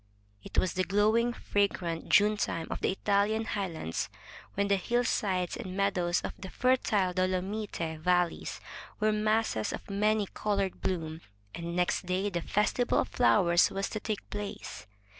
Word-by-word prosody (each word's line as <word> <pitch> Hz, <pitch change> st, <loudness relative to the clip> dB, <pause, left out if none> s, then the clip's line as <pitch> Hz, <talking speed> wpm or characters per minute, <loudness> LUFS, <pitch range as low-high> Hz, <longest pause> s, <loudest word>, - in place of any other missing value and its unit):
It -, -, -8 dB
was 185 Hz, -, +2 dB
the 185 Hz, -, +1 dB
glowing, 215 Hz, +5 st, +3 dB
fragrant 190 Hz, -7 st, -1 dB
June 210 Hz, +1 st, +5 dB
time 165 Hz, -5 st, -2 dB
of -, -, -3 dB
the -, -, +2 dB
Italian 205 Hz, +3 st, +1 dB
high 200 Hz, -3 st, -1 dB
lands, 160 Hz, -, -4 dB, 0.5 s
when 200 Hz, 0 st, +1 dB
the 200 Hz, -, +4 dB
hillsides 195 Hz, -4 st, 0 dB
and 185 Hz, 0 st, -6 dB
meadows 180 Hz, -3 st, +1 dB
of -, -, -4 dB
the 190 Hz, -, -7 dB
fertile 215 Hz, -6 st, +2 dB
Dolomite 185 Hz, -2 st, -2 dB
valleys 180 Hz, 0 st, +1 dB, 0.4 s
were 215 Hz, 0 st, +3 dB
masses 215 Hz, -, +1 dB
of -, -, -7 dB
many 210 Hz, +1 st, +2 dB
colored 200 Hz, -3 st, -1 dB
bloom, 165 Hz, -3 st, -2 dB, 0.3 s
and 170 Hz, 0 st, -5 dB
next 180 Hz, 0 st, 0 dB
day 190 Hz, +3 st, 0 dB
the 175 Hz, -2 st, -2 dB
Festival 210 Hz, +7 st, +1 dB
of -, -, +1 dB
Flowers 175 Hz, -8 st, +4 dB
was 195 Hz, 0 st, -2 dB
to 215 Hz, -, -3 dB
take 215 Hz, -1 st, -4 dB
place. 205 Hz, -, -6 dB
195 Hz, 155 wpm, -30 LUFS, 180-210 Hz, 0.5 s, June